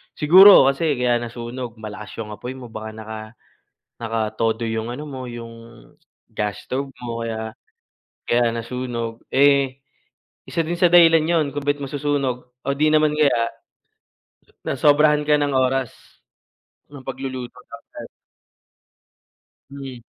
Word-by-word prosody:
Siguro 185 -1 +8
kasi 150 +3 0
kaya 125 -1 +1
nasunog 120 +1 -6
malakas 105 -1 -9
yung 105 -1 -8
apoy 115 +5 -7
mo 125 -2 -10
baka 110 0 -7
naka 110 0 -7 0.8
nakatodo 115 0 -1
yung 110 0 -3
ano 125 +5 -6
mo, 130 -4 -7
yung 115 -1 -8 0.7
gas 105 -1 -4
stove 135 +1 -3
mo. 115 -1 -5
Kaya 110 -1 -5 0.7
kaya 120 -1 +1
nasunog, 115 -1 -4
eh, 140 -1 +3 0.7
isa 165 - 0
din 170 +2 -3
sa 180 - +6
dahilan 165 -2 +6
yun 165 -2 +2
kung 145 0 -5
ba't 145 0 +2
masusunog 140 -2 -1 0.3
o - - -1
di 150 +3 +2
naman 155 0 +3
kaya 140 -6 +2 1.1
nasobrahan 150 +2 +3
ka 150 0 +5
ng 145 -1 0
oras 130 -1 +1 1.0
ng 140 - -10
pagluluto 130 -2 -6 0.2
that - - -10
time. - - -8 1.6
Hmm, 135 -3 -8
130 Hz, 130 wpm, -21 LUFS, 115-145 Hz, 1.6 s, Siguro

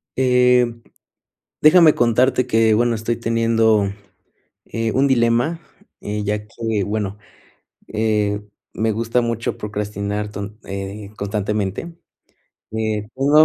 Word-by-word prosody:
Eh, 125 -1 +4 1.0
déjame 155 0 +7
contarte 125 +2 +2
que, 115 -2 +3
bueno, 120 +2 +2
estoy 115 +1 -2
teniendo, 115 -3 +2 0.8
eh, 115 -1 -2
un 135 +2 +3
dilema, 120 +5 +2 0.4
ya 105 0 -2
que, 110 -2 -2
bueno, 105 -1 -3 0.7
eh, 105 -2 0 0.3
me 110 0 0
gusta 115 +3 0
mucho 115 -1 -2
procrastinar 105 0 -3
ton 105 +1 -7
eh, 100 +1 -6
constantemente, 105 - -2 0.8
eh, 110 -1 -2
tengo 145 +4 +5
110 Hz, 105 wpm, -20 LUFS, 105-120 Hz, 1.0 s, déjame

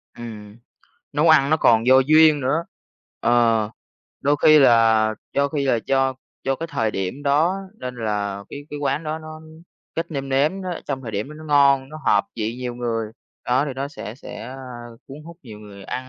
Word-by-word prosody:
Ừm, 110 -3 -9 0.6
nấu 150 +3 +2
ăn 145 -3 +5
nó 155 - +4
còn 115 -6 +3
do 130 +1 +7
duyên 155 +2 +5
nữa. 150 +6 0 0.6
Ờ, 115 -3 +2 0.5
đôi 145 +1 +2
khi 155 0 +7
là 115 -4 +4 0.2
do 140 0 +1
khi 140 -1 -2
là 120 -4 +2
do 135 -1 +1 0.3
do 135 - +1
cái 165 - -5
thời 110 -8 -1
điểm 95 +8 -4
đó, 155 +6 +2 0.2
nên 125 -1 -6
là 100 -3 -3
cái 145 - -8
cái 145 - -5
quán 140 +1 -1
đó 155 +1 -3
nó 155 0 -10 0.5
cách 165 +1 -2
nêm 135 -2 -4
nếm 150 +8 +1
đó, 180 -2 -4
trong 135 -2 -3
thời 115 - -6
điểm 105 +6 -3
đó 150 - -10
nó 155 +1 -11
ngon, 140 -3 +3
nó 155 - -9
hợp 100 -1 +4
vị 110 0 -2
nhiều 125 -1 -5
người, 115 -3 -3 0.3
đó, 130 +3 +2
thì 145 - -4
nó 135 +2 -4
sẽ 115 -6 -8
sẽ, 130 - -10
a, 130 +4 -8 0.5
cuốn 135 - -9
hút 170 +1 -11
nhiều 110 -6 -11
người 100 -2 -12
ăn 130 0 -5
135 Hz, 200 wpm, -22 LUFS, 115-150 Hz, 0.6 s, do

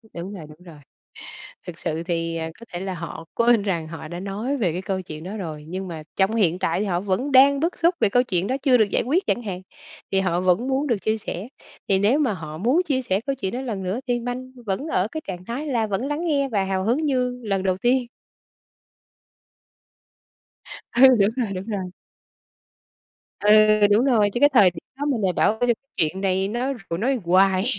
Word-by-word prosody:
Đúng 175 +4 -6
rồi, 160 -5 -8
đúng 155 +3 -15
rồi. 165 -4 -13 0.9
Thực 170 -2 -8
sự 160 +1 -3
thì, 165 -1 -2
à, 160 0 -3
có 230 - -11
thể 175 - -4
là 190 0 -4
họ 165 -1 -7
quên 235 -2 +4
rằng 170 -6 -2
họ 165 -1 -8
đã 175 +2 -6
nói 210 +8 -3
về 190 -10 0
cái 180 +3 -4
câu 190 0 -3
chuyện 155 -2 -9
đó 200 +4 -6
rồi, 155 -7 -6
nhưng 185 +2 -5
mà 160 -2 -6
trong 195 +3 +2
hiện 180 -6 +2
tại 185 - 0
thì 210 - -1
họ 175 -3 0
vẫn 205 +9 -1
đang 275 +2 +6
bức 335 +3 -1
xúc 340 +2 +3
về - - +4
câu 245 +5 +3
chuyện 190 -7 -1
đó 260 +5 0
chưa 265 -3 +5
được 215 -4 +2
giải - - +1
quyết 335 - 0
chẳng 240 - 0
hạn, 190 -4 -5 0.5
thì 195 - +3
họ 175 -2 0
vẫn 185 +7 +1
muốn 270 +2 0
được 240 -5 +1
chia 220 +2 -1
sẻ. 200 0 -6 0.4
Thì 195 - +4
nếu 210 +8 +3
mà 275 -7 +1
họ 155 -3 -8
muốn 250 - +2
chia 260 -3 0
sẻ 195 -4 0
câu 275 - 0
chuyện 190 -7 -3
đó 260 - -3
lần 215 -7 -4
nữa 190 +6 -2
thì 240 -1 +1
minh 250 +2 -5
vẫn 200 +9 -2
ở 185 -8 +1
cái 315 - -3
trạng 180 -1 -6
thái 250 +9 -4
là 235 -6 0
vẫn 210 +5 -2
lắng 295 +4 -2
nghe 280 -3 +1
và 205 -5 0
hào 190 0 -1
hứng 255 +8 +1
như 250 -3 0
lần 195 -3 -1
đầu 185 -1 +1
tiên. 245 +4 +1 2.9
Ừ, 245 - +4 0.2
đúng 200 -1 +4
rồi, 235 -6 -1
đúng 185 +2 -6
rồi. 195 -5 -4 1.5
Ừ, 205 - +3 0.4
đúng 220 +5 +4
rồi, 220 -6 +3
chứ 240 - -2
cái 290 - +7
thời 205 -8 +6
điểm 165 - -11
đó 285 - -3
mình 265 -7 0
lại 185 -2 +2
bảo 215 +4 +1
cái 245 -1 +3 0.2
chuyện 165 +4 0
này 190 0 0
nó 245 +5 -1 0.3
nói 255 +1 0
hoài 185 +2 +3
205 Hz, 220 wpm, -23 LUFS, 185-250 Hz, 2.9 s, cái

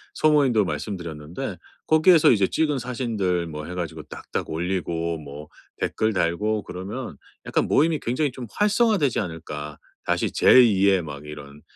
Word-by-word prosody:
소모임도 140 -9 +3
말씀드렸는데 85 -7 -5 0.3
'거기에서 160 0 +6
이제 100 -4 +3
찍은 150 -4 0
사진들 110 -8 -2
뭐 75 -1 -7
해 90 - -7
가지고 80 -3 -5
딱딱 - - -6
올리고 85 -1 -2
뭐 75 0 -10 0.3
댓글 110 0 0
달고 105 +4 0
그러면 100 +8 -7 0.3
약간 - - 0
모임이 160 +1 +2
굉장히 130 +4 -1
좀 120 -1 -8
활성화되지 210 - +2
않을까? 75 -5 -6 0.3
다시 - - 0
제 - - +4
2 100 -4 +3
의 95 -3 +3
막 75 -1 -8
이런 75 -1 -10
95 Hz, 320 characters per minute, -24 LUFS, 80-125 Hz, 0.3 s, 거기에서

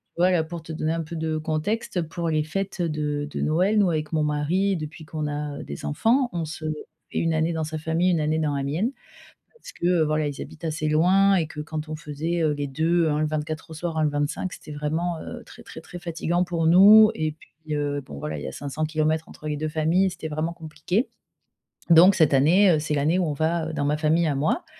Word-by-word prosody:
Tu 170 - -2
vois, 180 +1 +5
là 170 -3 +2
pour 165 0 -7
te 165 - -9
donner 155 0 -1
un 165 0 -2
peu 165 +2 -7
de 160 -1 -1
contexte 165 +5 -2
pour 165 +1 -3
les 155 -1 +1
fêtes 195 +3 -3
de 150 -3 -1
de - - -4
Noël, 185 +7 +2
nous 200 -3 +4
avec 155 -1 -2
mon 155 -1 +2
mari 165 +7 +1
depuis 155 0 -7
qu'on 155 -1 -4
a 145 -1 -4
des 70 - -8
enfants, 235 - +2
on 170 -2 -2
se 155 +1 -8 0.5
fait - - -4
une 165 0 +1
année 160 +1 +1
dans 160 -1 -2
sa 155 +1 -5
famille, 160 +3 +1
une 165 -3 +1
année 155 +1 0
dans 150 -2 0
la 140 - -2
mienne. 165 - -1 0.7
Parce - - -11
que 175 -1 +2
voilà, 155 0 0
ils 145 -2 -5
habitent 155 - -10
assez 155 -1 -2
loin 185 +6 +4
et 170 -4 +2
que 155 0 -9
quand 155 0 -5
on 155 - -3
faisait, 160 +3 -3
heu, 155 -1 +2
les 145 0 -3
deux, 160 +4 +1
un 150 0 0
le 155 - +1
24 155 +1 -4
au - - -6
soir, 165 0 -4
un 155 - +2
le - - +2
25 145 +5 -2
c'était - - -11
vraiment, 160 +3 -2
heu, - - -8
très, - - -14
très, - - -10
très 175 - -10
fatiguant 175 0 -1
pour 170 -2 -1
nous 205 +6 +8
et 155 -7 -2
puis, 155 -1 -8
heu, 145 -1 -1
bon 75 - -10
voilà, 75 +2 -4
il 70 - -7
y - - -4
a 65 - -6
500 145 +2 -3
kilomètres 155 +1 0
entre 155 - -8
les 150 - -2
2 155 +1 -2
familles, 160 +5 +2
c'était 160 - -6
vraiment 155 +2 -2
compliqué. 165 - -2 0.8
Donc 175 +4 +8
cette 160 -5 +3
année, 175 +9 +5
heu, 155 - +3
c'est 150 0 -2
l'année 155 +5 +2
où 180 - +1
on 155 - -1
va 160 +2 -1
dans 145 -2 -1
ma 145 +1 +1
famille 160 +2 +2
à 155 - +1
moi 145 - 0
160 Hz, 245 wpm, -24 LUFS, 150-170 Hz, 0.8 s, nous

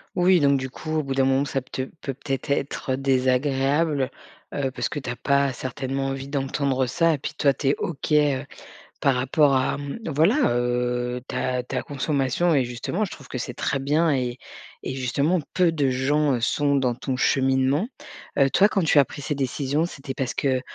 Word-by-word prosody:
Oui, 180 0 +4
donc 140 -2 +3
du 130 - -4
coup, 155 +4 -7
au - - -1
bout 135 -1 -3
d'un 135 0 +3
moment, 135 +1 +3
ça 140 -1 -1
te 130 - -5 0.2
peut 135 - -3
peut-être, 135 +1 -4
être, 140 -1 -1
heu, 130 - +1
désagréable, 135 +2 +1 0.4
heu, 140 -2 -1
parce 130 - -2
que 145 - -4
tu 130 - -6
as 125 - -2
pas, 140 +1 +2
certainement, 135 +2 -3
envie 135 0 -3
d'entendre 135 -1 0
ça, 165 +6 +2
et - - -5
puis - - -5
toi, 140 - +3
tu 135 0 -1
es 140 - +3
OK, 155 -1 -4
heu, 145 -2 +3 0.5
par 140 - +3
rapport 135 +2 +3
à, 130 +1 +1
mmh, 145 +9 -6
voilà, 200 - +3
heu, 125 0 -1
ta 125 -1 -1
ta 130 +1 -3
consommation, 145 +3 0
et 135 -3 +3
justement 130 - -2
je - - -9
trouve 140 - -11
que 125 - -4
c'est 125 0 -4
très 140 - -1
bien 150 +4 +2
et 125 -2 -1 0.5
et 130 - -4
justement, 140 +7 +1
peu 180 -2 +3
de 145 -4 +1
gens, 140 +3 +1
heu, - - -2
sont 140 +3 +1
dans 130 -3 +2
ton 130 +2 -3
cheminement. 135 - +2 0.5
Heu, 135 -1 +5
toi, 195 +9 +5
quand 195 -3 0
tu 150 -2 +5
as 140 - +6
pris - - -9
cette 145 0 -3
décision, 140 +4 0
c'était 135 -5 -7
parce 130 -2 -2
que, 130 -2 0
135 Hz, 205 wpm, -24 LUFS, 130-145 Hz, 0.5 s, as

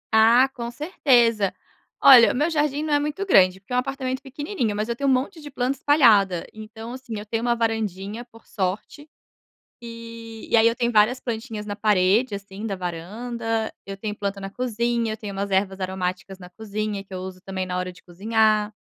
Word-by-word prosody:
Ah, 230 +4 +6
com 235 -1 -5
certeza. 240 - +2 0.5
Olha, 250 -4 +9
o - - -5
meu 295 +6 +1
jardim 295 -2 0
não 310 -1 -1
é 290 - +4
muito, 300 +7 -3
grande, 190 - +4
porque 200 - -21
é - - 0
um - - +4
apartamento 260 0 -3
pequenininho. 275 - -3
Mas 215 +2 -2
eu 235 - -1
tenho 275 +3 0
um - - +5
monte 285 +8 -1
de 295 -1 -9
planta 265 0 -2
espalhada. 210 - +4
Então, 220 +1 -9
assim, 250 -4 -7
eu 205 - -7
tenho 225 +1 -2
uma 240 0 +1
varandinha, 220 -1 -2
por 225 -1 -19
sorte, 205 +10 -4 0.7
e 230 -1 -9
e - - +4
aí 225 0 +5
eu 230 - -2
tenho, 240 0 0
várias 220 +4 +4
plantinhas 225 -3 -5
na 205 - -4
parede, 205 +3 +2
assim, 200 +1 -8
da 200 -3 -3
varanda. 220 +6 -4
Eu 195 0 -7
tenho 210 +1 -4
planta 200 -1 -3
na 195 - -5
cozinha. 235 0 -1
Eu - - -8
tenho 210 -2 -7
umas 200 +1 -3
ervas 190 0 0
aromáticas 185 0 -4
na 180 -1 -11
cozinha 210 +1 -4
que 195 - -19
eu 185 - -4
uso 185 0 -8
também 190 0 -4
na 180 0 -3
hora 180 0 -2
de 180 - -19
cozinhar. 215 +3 +1
220 Hz, 205 wpm, -23 LUFS, 195-245 Hz, 0.7 s, Olha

